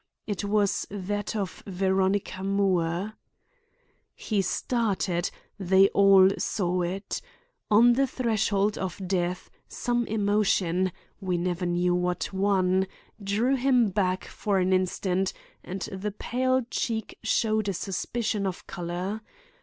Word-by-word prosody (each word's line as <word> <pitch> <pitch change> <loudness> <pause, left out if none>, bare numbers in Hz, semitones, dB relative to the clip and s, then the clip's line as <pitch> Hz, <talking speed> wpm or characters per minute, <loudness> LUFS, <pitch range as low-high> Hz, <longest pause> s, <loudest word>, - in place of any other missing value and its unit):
It 205 -1 -3
was 205 -1 +1
that 205 +2 -3
of 195 -4 -3
Veronica 190 0 0
Moore. 195 -1 0 1.0
He 210 -3 -1
started; 195 -3 0 0.3
they 190 +1 +5
all 195 -1 +6
saw 180 -3 0
it. 185 +4 -3 0.5
On 235 +3 +6
the 270 +2 +2
threshold 215 -5 0
of 190 -1 -4
death, 180 -1 -1 0.2
some 240 -1 -1
emotion—we 190 -3 0
never 175 +1 -1
knew 175 +1 +1
what 180 +1 -1
one—drew 195 +4 0
him 250 -4 +3
back 185 -1 0
for 205 -2 -1
an 185 0 +2
instant, 185 0 0 0.3
and 185 +2 -6
the 195 +2 -3
pale 255 +4 0
cheek 220 -2 -3
showed 215 -2 +1
a - - 0
suspicion 200 +3 -2
of 185 - -5
color. 180 +4 -4
195 Hz, 115 wpm, -27 LUFS, 185-210 Hz, 1.0 s, all